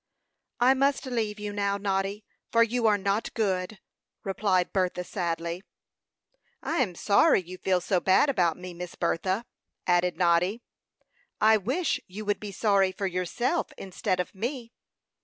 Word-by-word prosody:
"I 250 +2 +6
must 275 +1 +1
leave 220 -5 -2
you 210 0 -4
now, 200 -1 0
Noddy, 200 +1 -2 0.3
for 230 0 +5
you 235 0 +1
are 210 -1 +4
not 200 +2 -1
good," 195 -2 -1 0.5
replied 190 -2 0
Bertha, 180 -2 0
sadly. 170 -1 -3 1.0
"I 335 - -1
am 210 -10 0
sorry 205 - +4
you 180 +1 -10
feel 185 -1 +2
so 185 +1 +1
bad 190 +10 +4
about 180 - +1
me, 180 0 -8
Miss 175 0 -7
Bertha," 185 +6 -1 0.4
added 175 0 +2
Noddy. 180 +5 +2 0.8
"I 220 +1 +6
wish 260 - -1
you 210 +4 -8
would 205 0 0
be 210 -1 -6
sorry 195 -2 +2
for 195 - -4
yourself, 195 - -1
instead 185 -1 -2
of 180 - -3
me." 235 +3 -4
200 Hz, 150 wpm, -27 LUFS, 180-220 Hz, 1.0 s, I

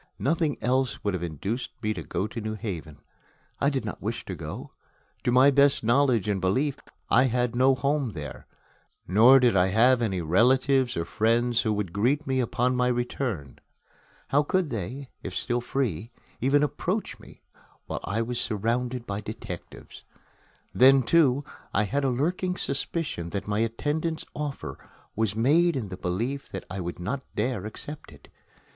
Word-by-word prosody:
Nothing 155 +1 0
else 130 0 0
would 100 - 0
have 90 - -2
induced 90 - -4
me 110 0 +1
to 90 - -6
go 95 - -2
to 115 +2 -5
New 110 0 -3
Haven. 85 -8 -6 0.6
I 140 - +3
did 135 -5 -2
not 105 - -6
wish 115 +4 -4
to 95 - -5
go. 80 -2 -7 0.5
To 120 - +3
my 130 +3 +6
best 140 -1 +4
knowledge 120 -3 +3
and 100 -3 0
belief, 130 +10 +1 0.3
I 125 +3 +6
had 125 -1 0
no 130 +2 +4
home 140 -3 0
there, 75 -5 -8 0.6
nor 115 +9 +7
did 125 -4 +3
I 90 -1 +4
have 120 +6 +4
any 100 -5 0
relatives 125 - +3
or 85 - -1
friends 115 +5 +2
who 110 - 0
would 100 -5 -3
greet 130 +9 +1
me 130 -1 0
upon 125 +1 +1
my 125 0 +2
return. 120 - -2 0.7
How 145 - +4
could 175 +1 0
they, 125 +6 -5
if - - -6
still 120 0 -1
free, 115 - -2 0.3
even 140 +4 +3
approach 175 +8 -2
me - - -16 0.4
while - - -4
I 110 +3 -1
was 120 +1 -2
surrounded 120 +3 -1
by 100 -1 -4
detectives? 110 +1 -9 0.7
Then, 135 +1 +6
too, 140 -1 +3 0.3
I 105 - +4
had 140 +8 -1
a 135 - +2
lurking 180 +8 -1
suspicion 140 - -2
that 100 +3 -4
my 105 0 0
attendant's 150 +8 -1
offer 140 - -5 0.4
was 110 -2 0
made 155 +9 +3
in 115 -7 -3
the 95 - -5
belief 115 +11 -3
that 95 - -6
I 95 - -4
would 85 -1 -4
not 125 +10 -3
dare 105 -2 -1
accept 145 - -7
it. 70 -2 -17
120 Hz, 170 wpm, -27 LUFS, 105-135 Hz, 0.7 s, nor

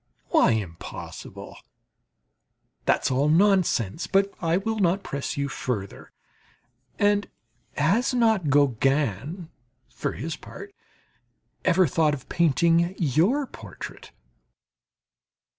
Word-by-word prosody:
Why - - +4
impossible? 95 -7 -7 1.3
That's - - +2
all 140 +3 +2
nonsense. 170 - +2
But 195 0 +2
I 165 0 +2
will 220 +3 -2
not 190 +1 +2
press 140 -5 -4
you 140 0 0
further. 110 -7 -5 0.9
And 205 0 +2 0.5
has 195 - +2
not 220 - +2
Gauguin, 140 - +1 0.4
for - - -4
his 160 +3 -4
part, 405 - -11 0.9
ever 185 0 +4
thought 155 0 +2
of 130 - -13
painting 170 +2 +2
your 175 - +2
portrait? 110 - -10
165 Hz, 95 wpm, -25 LUFS, 140-195 Hz, 1.3 s, Why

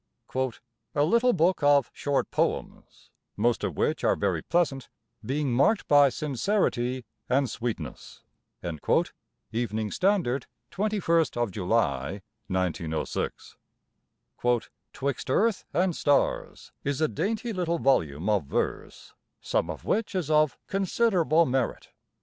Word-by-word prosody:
"A 145 - +3
little 235 +9 +4
book 180 -2 +2
of 145 -2 +4
short 140 -1 -1
poems, - - -3 0.3
most 115 +3 +1
of - - -2
which - - 0
are - - +3
very 95 -6 0
pleasant, 145 - 0 0.3
being 140 -1 -1
marked 170 - +3
by 145 -1 +6
sincerity 130 - -1 0.2
and 135 +2 +3
sweetness."—Evening 110 0 -4
Standard, 175 -10 +1 0.2
21st 165 - +1
July, 90 - 0 0.2
1906. 85 -4 -3 1.3
"''Twixt 140 -1 -3
Earth 215 - +2
and 180 -1 +1
Stars' 145 -1 0
is 140 0 -1
a 155 - +3
dainty 220 - -2
little 170 -3 0
volume 85 - +1
of 105 -8 +2
verse, - - -3 0.3
some - - -1
of - - -6
which 220 -2 0
is 165 -5 -1
of 155 -2 +3
considerable 185 -4 +2
merit." 130 -2 -1
140 Hz, 110 wpm, -27 LUFS, 115-175 Hz, 1.3 s, by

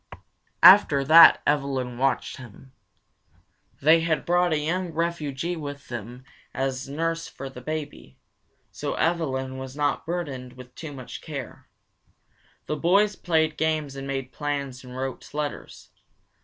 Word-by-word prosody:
After 180 -8 +8
that 160 +4 +8
Evelyn 135 -4 -1
watched 135 +1 0
him. 130 +1 -13 1.1
They 160 +3 +6
had 165 -1 -1
brought 175 0 +2
a 155 - +2
young 175 +4 -2
refugee 165 -1 -2
with 145 -3 -8
them 120 +2 -7 0.3
as 135 0 -2
nurse 165 +3 -2
for 135 0 -8
the 125 - -10
baby, 145 - -6 0.5
so - - -4
Evelyn 135 -6 -1
was 130 0 -8
not 145 +1 -1
burdened 140 -8 -4
with 125 -1 -13
too 155 -3 -8
much 130 -3 -9
care. 140 -6 -8 1.0
The 150 - -3
boys 200 +6 +3
played 160 -3 0
games 155 -3 -1
and 135 0 -6
made 135 -1 -4
plans 140 -3 -4
and 125 0 -10
wrote 130 0 -5
letters. 150 -1 -5
145 Hz, 135 wpm, -25 LUFS, 130-160 Hz, 1.1 s, After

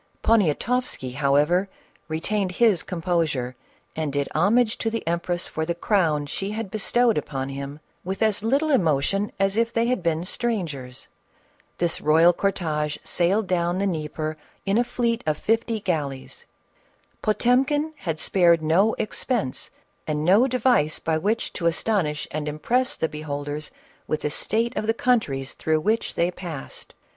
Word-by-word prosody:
Poniatoffsky, 215 - +1
however, 150 +7 +2 0.4
retained 185 +4 -1
his 210 -5 +4
composure 165 -9 -1 0.4
and 155 -2 -2
did 140 0 -1
homage 215 +7 +3
to 225 - 0
the 225 -6 -4
empress 170 +1 -1
for 160 - -3
the 170 +1 -2
crown 165 -6 +1
she 195 +7 -4
had 215 -2 -4
bestowed 230 0 +2
upon 135 -2 -4
him, 140 +2 -6 0.2
with 190 +4 -2
as 215 -2 +2
little 275 +8 +1
emotion 195 - +2
as 195 0 +2
if 230 +1 +1
they 230 0 +1
had 250 -3 0
been 165 0 0
strangers. 160 - -3 0.7
This 170 -1 0
royal 165 +3 +5
corlfye 155 -6 -1
sailed 195 +5 +1
down 175 -1 0
the 200 - 0
Dnieper 155 -3 -3 0.3
in 200 +3 +2
a - - +4
fleet 235 -1 -1
of 155 -1 +1
fifty 225 +2 0
galleys. 150 -9 -3 0.7
Potemkin 270 +8 +2
had 165 - -3
spared 170 -4 +4
no 185 +8 +3
expense 215 - -2 0.4
and 150 0 -1
no 205 +9 +5
device 245 - +2
by 160 -1 -1
which 210 +7 -1
to 170 - -1
astonish 170 -4 0
and 150 0 -3
impress 240 - 0
the 160 - 0
beholders 150 -1 -5 0.4
with 155 - -1
the 150 - -1
state 230 - -1
of 215 - -2
the 225 - +2
countries 150 - 0
through 155 -1 0
which 220 +6 0
they 170 +1 +1
passed. 170 -6 -8
175 Hz, 150 wpm, -24 LUFS, 155-220 Hz, 0.7 s, royal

